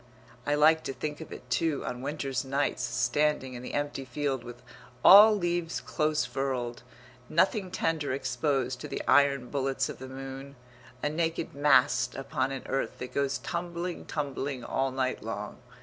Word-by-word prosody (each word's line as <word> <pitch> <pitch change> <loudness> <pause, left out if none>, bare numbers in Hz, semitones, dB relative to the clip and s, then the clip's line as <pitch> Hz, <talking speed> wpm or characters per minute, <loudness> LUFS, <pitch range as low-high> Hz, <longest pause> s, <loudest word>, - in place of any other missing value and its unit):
I 145 - +3
like 160 +2 +5
to 135 - -3
think 150 +4 -5
of 160 - -9
it, 125 - -9
too, 160 +2 0
on 125 0 -4
winter's 135 -2 -2
nights 135 +1 -1
standing 130 +3 +1
in 120 - -7
the 125 - -6
empty 145 -1 -2
field 135 -1 -2
with 120 0 -10 0.4
all 210 +2 +10
leaves 175 -3 -1
close 155 0 0
furled, 125 -3 -3 0.5
nothing 190 +3 +2
tender 165 -6 -1
exposed 130 -1 -1
to - - -5
the - - -4
iron 140 -3 +4
bullets 135 -2 0
of - - -7
the 130 0 -8
moon, 135 +1 -8 0.5
a 150 - +2
naked 165 +1 -2
mast 135 -3 +3
upon 135 0 -2
an 135 - -5
earth 135 - -2
that 125 - -7
goes 140 -1 0
tumbling, 175 +1 -4
tumbling, 140 -3 -3
all 135 0 0
night 130 0 -1
long. - - -5
140 Hz, 165 wpm, -29 LUFS, 130-150 Hz, 0.5 s, all